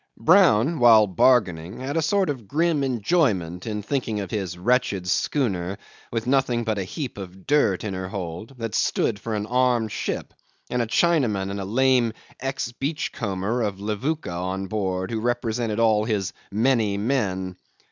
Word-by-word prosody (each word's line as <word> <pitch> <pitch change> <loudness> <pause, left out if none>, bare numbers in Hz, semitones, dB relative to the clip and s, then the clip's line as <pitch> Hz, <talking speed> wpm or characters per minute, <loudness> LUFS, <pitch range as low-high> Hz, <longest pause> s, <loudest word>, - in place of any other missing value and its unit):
Brown, 160 - +4
while 115 -3 +7
bargaining, 95 -4 +2
had 135 +3 -4
a 165 - +2
sort 185 +1 +2
of 120 -7 -8
grim 160 - +1
enjoyment 110 - 0
in 105 -1 -3
thinking 115 -4 -2
of 95 -3 -5
his 95 -4 -3
wretched 100 -2 +1
schooner, 95 -4 0 0.3
with 115 0 -2
nothing 125 -2 +1
but 110 -2 -1
a - - -1
heap 125 - -6
of 95 -1 -9
dirt 140 -10 +2
in 105 -3 -3
her 95 0 -4
hold, 95 +5 -6
that 115 -2 -4
stood 105 -3 +1
for 110 +1 -3
an 105 0 -2
armed 120 -2 +1
ship, - - -4 0.4
and 125 - +1
a 115 - -1
Chinaman 115 - +2
and 100 - -4
a 95 - -4
lame 120 +1 +2 0.3
ex 135 -2 -3
beachcomber 120 - -2
of 100 -3 -2
Levuka 110 - -2
on 95 +2 -3
board, 95 -1 -2
who 115 - -1
represented 115 -2 -1
all 110 -2 +4
his 105 -5 -1 0.2
many 110 -2 +2
men. 100 -6 -1
110 Hz, 165 wpm, -24 LUFS, 95-130 Hz, 0.4 s, while